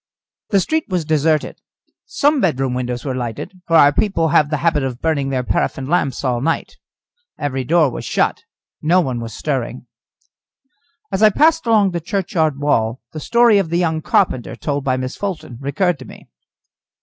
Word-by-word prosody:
The 200 - +3
street 315 - 0
was 180 -4 -1
deserted. 155 0 0 0.5
Some 295 - +2
bedroom 135 -7 0
windows 125 0 -3
were 135 - -2
lighted, 125 - -5
for 165 - +2
our 145 -2 +6
people 165 -5 +1
have 150 -2 +3
the 150 - 0
habit 155 0 +1
of 130 -2 -4
burning 150 -4 0
their 130 -2 -1
paraffin 130 +1 -1
lamps 140 -4 0
all 125 -3 0
night. 165 +4 -2 0.6
Every 135 -3 -2
door 155 0 +3
was - - -6
shut, - - 0 0.4
no 170 +4 +3
one 130 -8 -1
was 115 -2 -7
stirring. 130 -4 -3 1.3
As 190 +1 -1
I 215 - +8
passed 315 +5 +2
along 210 -4 +4
the 170 -1 -3
churchyard 165 -5 -1
wall, 120 -5 0
the 155 - -6
story 235 +3 +4
of 185 -5 -1
the 170 - 0
young 160 -3 0
carpenter, 125 -5 0
told 145 -2 -3
by 130 -1 0
Miss 130 0 -4
Fulton, 170 - -5
recurred 150 +4 0
to 130 - -10
me. - - -14
155 Hz, 175 wpm, -19 LUFS, 130-180 Hz, 1.3 s, I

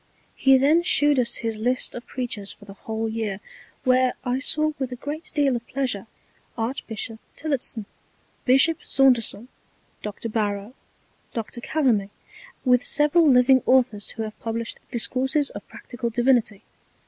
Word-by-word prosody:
He 270 -1 +5
then 295 +6 +4
shewed 290 -5 +3
us 235 -1 0
his 225 -1 -2
List 250 +3 0
of 240 - -8
Preachers 235 -6 -4
for 205 - -14
the 200 - -10
whole 220 +2 -4
Year, 220 -3 -3 0.4
where 255 -1 +3
I 250 0 -1
saw 305 +2 +2
with 260 -2 -3
a - - -4
great 295 +5 -6
deal 280 -4 +3
of 235 0 -6
Pleasure 250 -7 -2 0.5
Archbishop 225 -2 -4 0.2
Tillotson, 265 -7 -2 0.6
Bishop 275 +6 +3
Saunderson, 245 -4 +2 0.5
Doctor 210 +2 -5
Barrow, 210 0 -2 0.6
Doctor 230 +1 -5
Calamy, 240 -10 +1 0.6
with 250 -1 +4
several 300 +2 +3
living 255 0 +5
Authors 250 -5 +2
who 225 - -5
have 215 -1 -8
published 230 0 -4
Discourses 265 +5 +1
of - - -9
Practical 240 -1 -6
Divinity. 235 -3 +1
245 Hz, 140 wpm, -24 LUFS, 225-270 Hz, 0.6 s, He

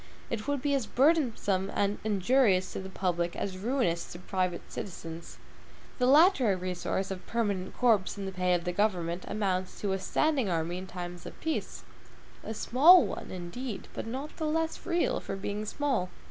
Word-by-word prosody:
It 225 +1 -3
would 285 -2 -1
be 290 -1 +1
as 270 -5 0
burdensome 240 - +2
and 200 0 +1
injurious 205 -2 +2
to - - -4
the 190 0 -7
public 175 -2 -1
as 185 -2 -4
ruinous 200 -7 0
to - - -7
private 180 -1 -2
citizens. 170 -3 -7 0.6
The 250 - +3
latter 275 - +5
resource 185 +1 -2
of 185 -1 -6
permanent 200 -5 -2
corps 220 -6 +3
in 200 - -4
the 190 - -4
pay 180 -1 +1
of 175 - -2
the 180 - -1
government 180 -3 0
amounts 190 -3 -2
to 200 - 0
a 190 - 0
standing 270 +2 +1
army 170 +1 -1
in 190 - -8
time 175 -1 -6
of - - -10
peace; 320 -1 -3 0.6
a 220 - -5
small 290 +8 +7
one, 200 - -6
indeed, 190 +6 -6
but - - -5
not 270 +6 -5
the 315 - -1
less 325 +3 -1
real 345 -1 +1
for - - -5
being 205 +2 -4
small. 255 -9 -1
200 Hz, 175 wpm, -29 LUFS, 185-255 Hz, 0.6 s, small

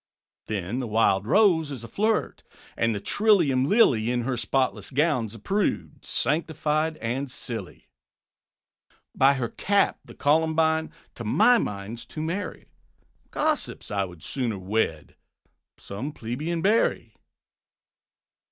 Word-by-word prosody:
Then 105 +3 -3
the 125 - -3
Wild 105 -2 +2
Rose 175 - +4
is 130 -5 -6
a - - -7
flirt; 215 - 0 0.3
And 115 -1 +1
the - - -2
trillium 165 - +3
Lily, 125 - +4
In 125 0 0
her 130 +1 -1
spotless 130 +2 0
gown, 140 -5 +1
's 110 - -10
a - - -10
prude, 200 - -2
Sanctified 155 +2 -1
and 125 +5 -3
silly. 115 -6 -7 1.3
By 135 +1 +4
her 120 -3 -2
cap 200 0 +1
the - - -14
Columbine, 160 +1 +2 0.2
To 115 - -8
my 240 - +4
mind, 105 - -4
's - - -11
too 155 - -6
merry; 180 +6 -4 0.6
Gossips, 305 - -1
I 100 -1 0
would 90 -4 -12
sooner 120 -6 -2
wed 95 -5 -2 0.6
Some 130 +10 -6
plebeian 150 +9 -3
Berry. 215 +4 +1
135 Hz, 130 wpm, -25 LUFS, 115-160 Hz, 1.3 s, Rose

